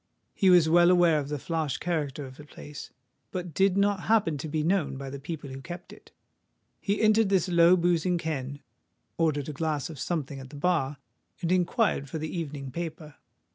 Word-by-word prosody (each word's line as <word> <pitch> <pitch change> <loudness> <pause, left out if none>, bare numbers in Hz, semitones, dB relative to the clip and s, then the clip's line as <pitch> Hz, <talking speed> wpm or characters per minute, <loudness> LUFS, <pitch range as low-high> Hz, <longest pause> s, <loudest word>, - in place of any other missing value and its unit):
He 190 - +3
was 175 -3 +6
well 175 +2 +6
aware 175 -3 +5
of 140 -1 -5
the 150 - -2
flash 155 -1 -2
character 150 -5 -2
of 130 0 -11
the 150 - -10
place, 145 0 -10 0.4
but 180 -3 -5
did 195 +3 +3
not 200 -2 +1
happen 210 -8 +3
to 160 - -4
be 155 0 -1
known 155 -6 0
by 135 0 -6
the 140 - -6
people 145 -1 -6
who 135 +1 -7
kept 175 +3 -9
it. - - -17 0.7
He 200 +1 -1
entered 215 -1 +4
this 190 -3 +2
low 175 0 +5
boozing 175 0 +1
ken, 145 -4 -4 0.6
ordered 150 -4 +1
a 150 - -4
glass 155 0 -2
of 150 - -10
something 145 -5 -3
at 130 0 -10
the 145 - -11
bar, 145 -3 0 0.5
and 170 - 0
inquired 180 - +1
for 160 - -4
the 155 +3 -5
evening 145 -5 -5
paper. 160 -1 -6
160 Hz, 195 wpm, -28 LUFS, 145-180 Hz, 0.7 s, was